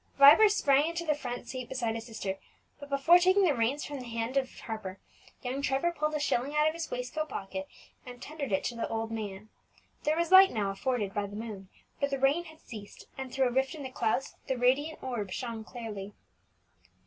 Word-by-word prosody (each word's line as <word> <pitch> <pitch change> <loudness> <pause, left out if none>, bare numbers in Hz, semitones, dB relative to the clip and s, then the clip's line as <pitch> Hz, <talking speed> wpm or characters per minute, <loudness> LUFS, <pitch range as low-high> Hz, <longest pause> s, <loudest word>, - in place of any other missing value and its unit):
Vibert 290 +10 +9
sprang 290 -7 +3
into 340 0 -4
the 305 - +3
front 245 -4 -6
seat 255 -2 -6
beside 240 -4 -1
his 225 +1 -6
sister, 200 -4 -4 0.4
but 285 -1 -10
before 280 +6 +6
taking 375 +3 +4
the 335 -6 +4
reins 250 +4 0
from 290 -2 -5
the 250 - -8
hand 230 +2 -3
of 265 -1 +1
Harper, 215 -5 -6 0.4
young 260 +2 -2
Trevor 275 +5 +1
pulled 305 -2 -1
a - - 0
shilling 285 0 0
out 300 0 +4
of 315 - +1
his 335 0 -5
waistcoat 255 +5 -3
pocket, 195 -1 -5 0.4
and 245 -1 -10
tendered 290 -2 -5
it 190 - +1
to 240 - -2
the 230 - -2
old 225 0 -2
man. 210 -2 -5 0.5
There 305 +2 +1
was 340 0 0
light 380 0 +10
now 205 -4 -1
afforded 205 -1 -1
by 205 -1 -1
the 205 - -9
moon, 210 -4 -7 0.3
for 280 - +2
the 275 -1 -2
rain 280 +6 +2
had 315 -1 -13
ceased, 210 -3 -10
and 265 -1 -6
through 265 -1 +2
a - - -6
rift 265 +5 0
in 295 - -7
the 260 - -6
clouds 245 +2 0
the 265 - 0
radiant 270 +6 +1
orb 240 -7 -3
shone 230 +2 -4
clearly. 210 -4 -7
255 Hz, 215 wpm, -30 LUFS, 225-290 Hz, 0.5 s, light